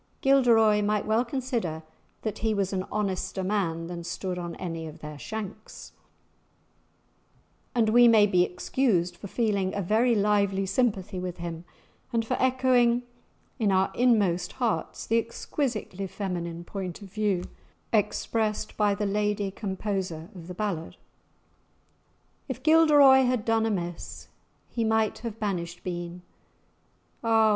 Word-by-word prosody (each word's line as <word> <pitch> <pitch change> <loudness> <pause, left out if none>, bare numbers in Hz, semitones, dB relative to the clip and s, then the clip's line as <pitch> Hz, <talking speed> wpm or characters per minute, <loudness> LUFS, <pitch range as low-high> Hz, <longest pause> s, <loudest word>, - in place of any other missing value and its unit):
Gilderoy 230 -6 +5
might 210 0 0
well 220 +2 +2
consider 235 - -3 0.4
that 215 -2 -3
he 220 -1 0
was 195 -1 -1
"an 185 -1 -2
honester 195 -2 -2
man 180 -4 -1
than 170 0 -6
stood 180 +1 -4
on 175 -1 -5
any 165 -2 -5
of 155 +1 -10
their 150 -2 -9
shanks," 215 +2 -7 1.8
and 225 -2 +3
we 240 +2 +7
may 220 -3 +7
be 185 -3 +3
excused 180 -1 0
for 200 - -9
feeling 200 -3 0
a 200 - -1
very 230 +6 +3
lively 200 -2 +2
sympathy 195 -2 0
with 180 -1 -5
him, 170 0 -6 0.5
and 230 -1 0
for 255 - 0
echoing 250 -2 +3 0.6
in 210 -4 +2
our 190 0 +2
inmost 200 -8 +2
hearts 240 -4 -2
the 230 +1 +3
exquisitely 230 -4 -3
feminine 175 -3 -4
point 190 +1 -6
of 195 -1 -13
view 205 -5 0 0.5
expressed 215 0 0
by 205 -1 +3
the 210 +1 -2
lady 205 0 0
composer 190 -5 -3
of 175 -3 -10
the 180 - -7
ballad. 190 -5 -3 1.5
"If 260 -2 -6
Gilderoy 295 -4 +7
had 245 -3 0
done 225 -1 +2
amiss, 175 -5 -4 0.4
He 230 - -2
might 220 -1 +1
have 225 -2 -6
banished 175 -4 -3
been; 175 0 -5 1.0
Ah! 225 -1 +4
205 Hz, 135 wpm, -27 LUFS, 180-225 Hz, 1.8 s, we